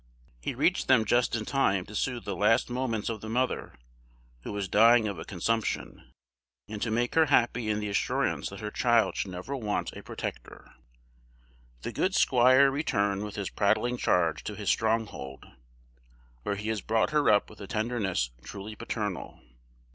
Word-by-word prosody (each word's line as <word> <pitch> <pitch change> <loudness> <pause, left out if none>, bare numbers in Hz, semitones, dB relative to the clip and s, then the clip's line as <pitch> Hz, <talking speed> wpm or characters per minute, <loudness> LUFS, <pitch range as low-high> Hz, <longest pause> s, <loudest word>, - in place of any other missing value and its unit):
He - - -4
reached - - +1
them 125 -4 +5
just 120 +3 +2
in 110 -2 -3
time 100 -10 +1
to 105 - -12
soothe 120 +2 -2
the 100 - -3
last 105 +5 +2
moments 120 -4 -2
of 110 -2 -3
the 110 - -7
mother, 125 +3 -1 0.7
who - - -6
was 100 -1 -3
dying 115 +3 +5
of 100 -5 -4
a - - -7
consumption, 110 +4 -2 0.6
and 105 -1 -7
to 115 - 0
make 120 +2 0
her 160 -1 +4
happy 120 -4 +2
in 105 0 0
the 105 - -3
assurance 100 - 0
that - - -9
her 105 0 -4
child 120 -1 +2
should 100 - -2
never 90 +10 -5
want 105 -6 -2
a - - -9
protector. - - -7 1.1
The - - -3
good 190 +1 0
squire 130 +2 +5
returned 100 -8 0
with 105 -1 -6
his 100 -2 -4
prattling 120 +4 +1
charge 85 -8 +1
to 105 - -4
his 105 -2 -3
stronghold, 110 -12 -2 1.0
where 100 - -2
he 105 +2 -4
has 110 -3 -1
brought 110 +4 +1
her 150 -1 +3
up 105 -1 +4
with 105 - -14
a 100 - -7
tenderness 105 - -1
truly 100 - -8
paternal. 105 -4 -4
110 Hz, 175 wpm, -28 LUFS, 100-120 Hz, 1.1 s, them